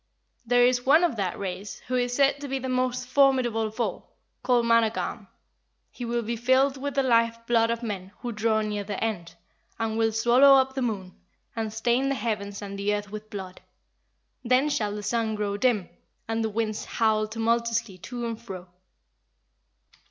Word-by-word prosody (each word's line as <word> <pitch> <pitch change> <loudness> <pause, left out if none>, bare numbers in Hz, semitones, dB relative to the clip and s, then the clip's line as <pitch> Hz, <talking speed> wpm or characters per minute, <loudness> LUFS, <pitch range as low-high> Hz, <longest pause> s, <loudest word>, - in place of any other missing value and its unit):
There 245 +1 +5
is 245 0 +2
one 300 +6 +5
of 330 -8 +2
that 190 -3 -2
race, 195 +1 -5
who 255 - -4
is 245 -1 0
said 280 +1 +3
to 285 - -5
be 270 0 -2
the 260 0 -4
most 255 -1 -1
formidable 255 -4 +3
of 215 +2 -11
all, 235 - -3 0.3
called 245 -2 +2
Managarm: 230 -1 +1 0.6
he 245 - -6
will 235 0 -1
be 235 +2 -2
filled 260 +4 +3
with 280 +1 -4
the 275 - +2
life 230 -2 +3
blood 230 -1 +3
of 235 +1 -2
men 195 -4 -5
who 245 - -5
draw 220 0 +1
near 210 -1 -2
their 200 0 -5
end, 205 -7 -3 0.4
and 225 0 -2
will 225 0 +3
swallow 245 +5 +6
up 265 0 +3
the 265 - -3
moon, 200 -7 -3 0.4
and 220 -2 -2
stain 240 +5 +1
the 275 - 0
heavens 210 -3 -3
and 200 0 -6
the 205 +1 +1
earth 205 -1 -6
with 215 0 -8
blood. 190 -3 -8 0.8
Then 255 +4 +3
shall 210 -6 -1
the 210 - -6
sun 220 +1 0
grow 205 -1 -2
dim, 210 -4 +1 0.4
and 225 0 -1
the 220 - 0
winds 215 0 -2
howl 215 -1 +1
tumultuously 230 -2 -1
to 240 +6 -5
and 230 -1 -4
fro." 185 -5 -9
230 Hz, 185 wpm, -26 LUFS, 210-250 Hz, 0.8 s, swallow